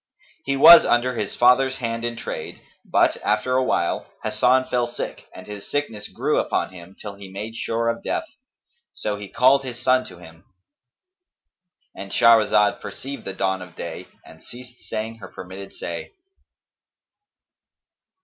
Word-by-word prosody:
He 135 Hz, 0 st, 0 dB
was 170 Hz, +4 st, +10 dB
under 120 Hz, +1 st, +2 dB
his 105 Hz, -4 st, -3 dB
father's 130 Hz, +2 st, +4 dB
hand 115 Hz, -2 st, -3 dB
in 120 Hz, 0 st, -2 dB
trade -, -, -6 dB, 0.2 s
but, -, -, +2 dB
after 105 Hz, +4 st, 0 dB
a 130 Hz, -, +3 dB
while, 85 Hz, -8 st, -1 dB, 0.2 s
Hasan 125 Hz, +4 st, +3 dB
fell 120 Hz, -1 st, 0 dB
sick 120 Hz, -, -7 dB
and 95 Hz, -, -10 dB
his 105 Hz, -1 st, -9 dB
sickness 115 Hz, -8 st, -3 dB
grew -, -, 0 dB
upon -, -, -1 dB
him, 90 Hz, +1 st, -13 dB
till 105 Hz, -2 st, -7 dB
he 100 Hz, -1 st, -11 dB
made 105 Hz, +4 st, -6 dB
sure 115 Hz, 0 st, -2 dB
of 115 Hz, 0 st, -1 dB
death; -, -, -2 dB, 0.7 s
so 105 Hz, -1 st, -3 dB
he 100 Hz, -1 st, -8 dB
called 135 Hz, +2 st, +4 dB
his 125 Hz, -2 st, -7 dB
son 130 Hz, +1 st, +3 dB
to 90 Hz, -, -12 dB
him,—And 120 Hz, -, -18 dB
Shahrazad 110 Hz, 0 st, +4 dB
perceived 140 Hz, +1 st, -8 dB
the 95 Hz, -, -4 dB
dawn 95 Hz, 0 st, -1 dB
of 90 Hz, -1 st, -11 dB
day -, -, -7 dB, 0.2 s
and 80 Hz, -, -16 dB
ceased 125 Hz, 0 st, -11 dB
saying 110 Hz, +1 st, -4 dB
her 110 Hz, -, -10 dB
permitted 95 Hz, +1 st, -10 dB
say. -, -, -7 dB
115 Hz, 150 wpm, -23 LUFS, 100-130 Hz, 0.7 s, was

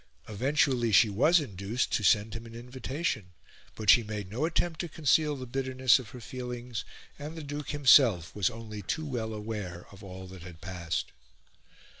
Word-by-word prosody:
Eventually 125 Hz, +1 st, +1 dB
she 105 Hz, +1 st, +6 dB
was 155 Hz, -, +4 dB
induced 105 Hz, -, -2 dB
to -, -, +2 dB
send 105 Hz, +1 st, +3 dB
him 115 Hz, 0 st, -7 dB
an 115 Hz, -, -11 dB
invitation; 125 Hz, -, -4 dB, 0.4 s
but 110 Hz, -, -6 dB
she 120 Hz, -, +6 dB
made 105 Hz, -3 st, -6 dB
no 125 Hz, +8 st, 0 dB
attempt 165 Hz, 0 st, -1 dB
to 175 Hz, -, -3 dB
conceal 150 Hz, 0 st, +2 dB
the 130 Hz, -2 st, -6 dB
bitterness 130 Hz, 0 st, +2 dB
of 120 Hz, -5 st, -9 dB
her 125 Hz, -, -10 dB
feelings, 125 Hz, -1 st, -6 dB, 0.4 s
and 150 Hz, +3 st, -7 dB
the 160 Hz, -, -6 dB
Duke 145 Hz, 0 st, -5 dB
himself 125 Hz, -, +5 dB
was 100 Hz, -3 st, +2 dB
only 110 Hz, -2 st, -8 dB
too 155 Hz, -, -3 dB
well 120 Hz, -6 st, -3 dB
aware 105 Hz, -5 st, -5 dB
of 100 Hz, +1 st, -14 dB
all 95 Hz, -1 st, -8 dB
that 95 Hz, -1 st, -11 dB
had 85 Hz, -2 st, -11 dB
passed. 85 Hz, -2 st, -4 dB
115 Hz, 175 wpm, -29 LUFS, 105-135 Hz, 0.4 s, she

